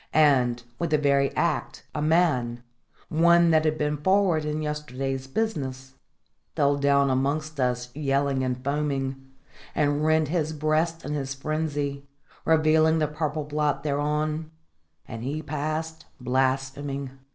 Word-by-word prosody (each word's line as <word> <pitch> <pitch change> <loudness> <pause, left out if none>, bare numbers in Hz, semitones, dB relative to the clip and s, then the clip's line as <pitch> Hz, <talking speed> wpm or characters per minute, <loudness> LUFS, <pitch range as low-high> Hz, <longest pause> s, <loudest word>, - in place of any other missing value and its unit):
And, 130 -6 +3 0.2
with 170 - -1
the 155 - +3
very 140 -1 +3
act, - - -1
a 150 - -2
man 150 -7 +1 0.5
one 170 +1 +5
that 160 0 +3
had 155 0 +1
been 150 0 0
forward 185 -1 +2
in 150 +1 -2
yesterday's 135 -3 -3
business 135 -8 -3 0.6
fell 145 0 +3
down 140 -1 +3
amongst 145 +3 -1
us 125 0 -1
yelling 140 -2 0
and 125 0 -2
foaming; 135 -2 -2 0.5
and 145 -1 +2
he - - -1
rent 155 -1 +2
his 160 -2 0
breast 155 +2 0
in 145 - -3
his 135 -2 -3
frenzy, 145 -1 -3 0.4
revealing 160 0 +4
the 155 -1 +1
purple 150 0 -2
blot 145 -1 -1
thereon, 150 +2 -1 0.6
and 115 - -7
he 150 +5 -3
passed 155 +2 -4
blaspheming. 135 +2 -1
150 Hz, 135 wpm, -26 LUFS, 135-155 Hz, 0.6 s, one